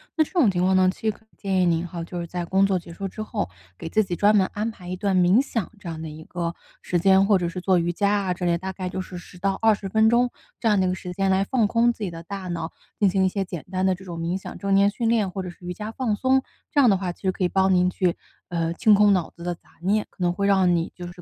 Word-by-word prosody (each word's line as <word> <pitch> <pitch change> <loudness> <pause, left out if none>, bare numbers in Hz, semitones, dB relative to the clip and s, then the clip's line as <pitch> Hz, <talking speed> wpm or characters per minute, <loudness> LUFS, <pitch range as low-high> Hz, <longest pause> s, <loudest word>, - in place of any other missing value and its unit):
那 315 - +4
这 - - -11
种 325 - +4
情 180 -2 0
况 190 +1 +3
呢， 185 0 +5
其 - - -19
实 220 - +1
可 220 - -19
以 - - -32
建 190 -2 0
议 180 - +3
您 170 0 +1
哈， 175 -1 -6
就 175 0 -5
是 - - -4
在 175 +1 -4
工 190 +3 +3
作 190 -2 +1
结 170 -1 -12
束 195 - -6
之 195 +3 -5
后， 95 - -3 0.3
给 165 - -6
自 215 - +3
己 185 -4 -2
专 205 +3 +4
门 195 -3 +4
安 215 +2 -2
排 180 -4 -13
一 185 - -3
段 190 0 0
冥 180 +6 +5
想 230 -7 -3
这 190 -3 -8
样 160 -1 -6
的 160 - -5
一 155 +1 -9
个 170 0 -4 0.3
时 180 - -1
间， 190 +2 +5
或 200 -2 +5
者 175 -1 -1
是 180 - -5
做 185 0 +2
瑜 170 0 +1
伽 200 +4 +1
啊 200 -3 +1
之 180 0 -4
类， 170 -1 +2
大 190 +2 -5
概 185 -1 -5
就 185 +1 -3
是 185 -1 -8
10 180 0 -12
到 195 +1 -1
20 210 -3 +2
分 220 +2 +4
钟， 245 +1 +3 0.3
这 225 - +2
样 205 -2 +3
的 190 - +2
一 - - +1
个 185 - -1
时 180 0 -7
间 195 +2 0
来 190 +1 +3
放 225 0 +1
空 235 +3 +3
自 230 - -12
己 200 - -1
的 165 0 -9
大 190 +1 -6
脑， 165 -2 -4 0.3
进 200 -2 +4
行 190 0 +2
一 - - +4
些 195 +1 -1
简 175 -4 -7
单 185 0 -1
的 190 - +3
这 190 +2 -9
种 170 -2 -6
冥 170 +3 -1
想、 - - -8
正 200 -1 -1
念 200 +1 +5
训 230 +2 -1
练 220 -4 +2
或 190 0 -4
者 180 - -5
是 175 - -12
瑜 180 - -3
伽 210 +4 -6
放 225 -3 -1
松。 265 +3 +2 0.3
这 290 - +2
样 260 -4 +6
的 200 - +5
话 185 -1 -2
其 - - -16
实 190 - +2
可 185 - -3
以 - - +4
帮 190 0 +3
您 180 0 +3
去， 180 -1 0 0.3
呃， 165 -1 -1
清 215 +4 +5
空 205 0 +6
脑 180 -4 0
子 170 - -13
的 175 0 -2
杂 - - -35 0.2
念， 205 +4 +1
可 185 - -15
能 175 - +3
会 200 +2 -1
让 190 -3 +4
你 165 0 -1
就 175 -1 -7
是 175 0 -11
190 Hz, 340 characters per minute, -24 LUFS, 175-205 Hz, 0.3 s, 样